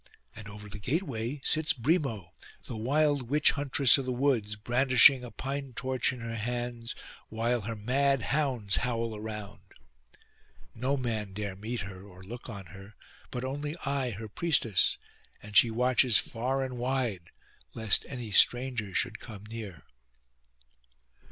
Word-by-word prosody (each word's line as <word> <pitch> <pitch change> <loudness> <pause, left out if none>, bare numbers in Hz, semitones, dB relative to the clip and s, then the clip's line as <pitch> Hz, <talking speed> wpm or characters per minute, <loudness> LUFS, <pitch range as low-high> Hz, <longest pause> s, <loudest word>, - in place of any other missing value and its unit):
And 105 -1 -9
over 105 0 -10
the 105 0 -8
gateway 135 - -2
sits 155 0 +2
Brimo, 120 - -1 0.3
the - - -6
wild 140 +2 +1
witch 150 +2 +4
huntress 140 -1 +4
of 135 - -4
the 130 - -2
woods, 120 -5 0
brandishing 125 +3 +5
a 125 - -7
pine 135 +1 -5
torch 125 +1 0
in 125 -2 -8
her 115 0 -5
hands, 120 +1 -3 0.3
while 115 +2 0
her 115 +2 -4
mad 135 +5 +1
hounds 130 -8 +1
howl 115 -3 -1
around. 105 -1 -7 1.1
No 130 +4 -1
man 110 -6 -3
dare 100 -1 -4
meet 110 +4 -4
her 95 -1 -8
or 95 -2 -14
look 120 +6 -9
on 100 -4 -7
her, 95 +2 -12 0.3
but 125 - -5
only 145 +3 -4
I 135 -2 0
her 110 0 -6
priestess, 115 - +2 0.5
and 105 0 -10
she 115 - +7
watches 125 0 +4
far 130 +4 -1
and 125 -2 -5
wide 120 -9 -2 0.5
lest 110 -3 +2
any 125 -5 -6
stranger 120 -2 +3
should 120 -3 0
come 105 -4 -10
near. 110 -5 -8
120 Hz, 145 wpm, -29 LUFS, 105-130 Hz, 1.1 s, she